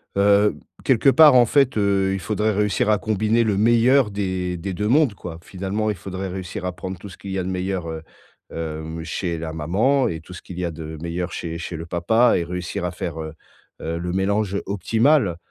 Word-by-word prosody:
Heu, 100 +1 +4 0.3
quelque 130 +1 +4
part, 150 -1 +7
en 120 - +7
fait, 135 +2 +3
heu, 100 -2 +2
il 95 - -2
faudrait 105 +3 0
réussir 105 +1 +1
à 105 - +4
combiner 110 +2 +1
le 105 -3 0
meilleur 120 +2 +4
des 95 -3 -2
des 95 +3 -4
2 105 +3 -2
mondes, 140 -1 +4
quoi. 85 -4 -8
Finalement, 100 +4 -3
il 105 - -1
faudrait 95 +1 -5
réussir 90 -1 -6
à 90 - -1
prendre 90 +1 -6
tout 100 - -10
ce 90 - -12
qu'il 100 - -8
y 95 - -2
a - - -1
de 90 - -4
meilleur, 90 -2 -2
heu, 80 -1 -5 0.5
hem, 80 0 -5
chez 85 +1 -3
la 80 0 -5
maman 105 - +1
et 80 -1 -4
tout 90 - -12
ce 90 - -9
qu'il 90 - -10
y - - -2
a 85 - -2
de 80 0 -7
meilleur 85 +1 -3
chez 85 -1 -4
chez 85 +1 -6
le 80 +1 -6
papa 110 +8 +3
et 85 - 0
réussir 90 0 -4
à 90 - -2
faire, 85 -3 -5
heu, 80 0 -6 0.5
heu, 80 +1 -3
le 90 +1 -3
mélange 100 +1 0
optimal. 110 - +2
95 Hz, 220 wpm, -22 LUFS, 85-105 Hz, 0.5 s, part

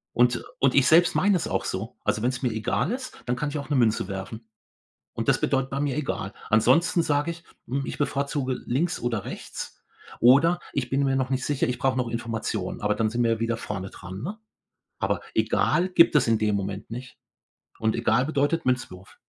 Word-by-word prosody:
Und 120 0 +3 0.2
und 135 -1 +3
ich 140 -2 +5
selbst 170 +2 +5
meine 200 0 +3
es 170 - -1
auch - - -1
so. 110 +6 -4
Also 110 - 0
wenn's 125 +2 -1
mir 120 - +1
egal 110 - -1
ist, 255 +1 -6
dann 125 -1 0
kann 150 +4 -2
ich 150 - -4
auch 140 -1 -6
'ne 145 - +1
Münze 110 -6 +2
werfen. 100 +4 -6 0.7
Und - - -4
das - - +3
bedeutet 135 0 0
bei 140 - -2
mir 145 -1 -1
egal. 120 -8 -3 0.2
Ansonsten 165 +11 +4
sage 145 +2 +1
ich: 170 +1 -10 0.2
„Hm, 135 +2 -1
ich - - -5
bevorzuge 140 -2 -1
links 160 +8 0
oder 115 -4 -2
rechts - - -7 0.4
oder 150 +9 +5
ich 125 -3 -2
bin 140 +1 +1
mir 135 -1 +2
noch 130 -1 0
nicht 130 0 0
sicher, 145 -4 0
ich 125 0 -2
brauche 130 -1 +1
noch 125 -2 0
Informationen“, 115 -1 -3
aber 105 0 +2
dann 110 0 +1
sind 120 +2 0
wir 115 - +2
ja 110 - -4
wieder 115 0 -1
vorne 95 -3 -5
dran, 95 +2 -9
ne? 200 +9 -5 0.6
Aber - - 0
egal 180 +2 +2
gibt 170 -3 +5
es 140 - +4
in 115 -1 +3
dem 105 -1 +1
Moment 100 0 -4
nicht. 125 +3 -8 0.6
Und 110 0 +1
egal 120 +2 +2
bedeutet 150 +2 0
Münzwurf. 120 -7 -2
125 Hz, 210 wpm, -25 LUFS, 115-145 Hz, 0.7 s, ich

